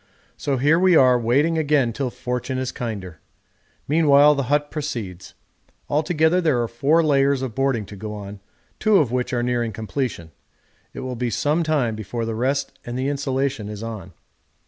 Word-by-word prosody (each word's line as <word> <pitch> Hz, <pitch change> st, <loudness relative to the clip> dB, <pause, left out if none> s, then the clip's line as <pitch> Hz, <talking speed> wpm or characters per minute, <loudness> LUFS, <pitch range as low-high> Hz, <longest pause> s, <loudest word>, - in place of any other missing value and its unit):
So 140 Hz, -2 st, -2 dB
here 150 Hz, +6 st, +3 dB
we 185 Hz, -1 st, +4 dB
are 125 Hz, -4 st, +5 dB
waiting 145 Hz, +8 st, +2 dB
again 145 Hz, -6 st, +2 dB
till 135 Hz, +1 st, -2 dB
fortune 125 Hz, +2 st, -4 dB
is 130 Hz, -1 st, -2 dB
kinder. 100 Hz, -9 st, -6 dB, 0.7 s
Meanwhile 150 Hz, -1 st, +5 dB
the 140 Hz, -2 st, -2 dB
hut 145 Hz, 0 st, +1 dB
proceeds; 110 Hz, -, -5 dB, 0.6 s
altogether 160 Hz, +3 st, +2 dB
there 155 Hz, -8 st, +2 dB
are -, -, -2 dB
four 145 Hz, +8 st, +2 dB
layers 140 Hz, -2 st, +2 dB
of 125 Hz, -4 st, -4 dB
boarding 135 Hz, -5 st, 0 dB
to 100 Hz, -, -11 dB
go 105 Hz, +2 st, -6 dB
on, 100 Hz, -1 st, -8 dB, 0.4 s
two 215 Hz, -2 st, +4 dB
of 140 Hz, -10 st, +2 dB
which 125 Hz, +1 st, -1 dB
are 120 Hz, -2 st, 0 dB
nearing 120 Hz, -2 st, -1 dB
completion; 110 Hz, -, -4 dB, 0.6 s
it -, -, -8 dB
will 130 Hz, -1 st, -4 dB
be 120 Hz, 0 st, -2 dB
some 150 Hz, +7 st, 0 dB
time 145 Hz, -8 st, 0 dB
before 110 Hz, +2 st, -4 dB
the 115 Hz, -, -3 dB
rest 135 Hz, +5 st, -2 dB
and 120 Hz, +1 st, -5 dB
the 130 Hz, +2 st, -1 dB
insulation 135 Hz, -5 st, -2 dB
is 105 Hz, +1 st, -7 dB
on. 105 Hz, -6 st, -7 dB
130 Hz, 175 wpm, -22 LUFS, 115-145 Hz, 0.7 s, are